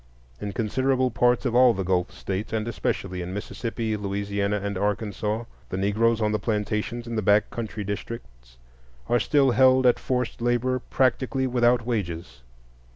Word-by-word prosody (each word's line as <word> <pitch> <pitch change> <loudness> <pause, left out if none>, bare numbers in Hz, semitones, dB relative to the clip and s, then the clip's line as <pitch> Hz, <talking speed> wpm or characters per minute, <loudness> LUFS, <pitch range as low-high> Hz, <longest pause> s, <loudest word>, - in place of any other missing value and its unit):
In 100 - -4
considerable 130 +4 +1
parts 120 +3 +2
of 125 - 0
all 125 -1 +6
the 95 - -2
Gulf 90 -1 0
States, 100 +3 -4
and 110 0 -1
especially 95 -5 -2
in 90 +2 -5
Mississippi, 115 +1 -3
Louisiana, 100 0 -1
and 100 +1 -3
Arkansas, 105 +2 -1 0.3
the 95 - -3
Negroes 110 +4 +2
on 105 0 +2
the 105 - 0
plantations 105 +3 -2
in 115 -1 -5
the - - +1
back 105 +1 +3
country 110 -2 -4
districts 65 - -7 0.5
are 120 - +3
still 135 +2 +3
held 130 +1 +5
at 125 - +4
forced 125 -2 -2
labor 120 +2 +1
practically 130 +1 0
without 120 -2 +2
wages. 85 - -3
110 Hz, 160 wpm, -25 LUFS, 100-120 Hz, 0.5 s, all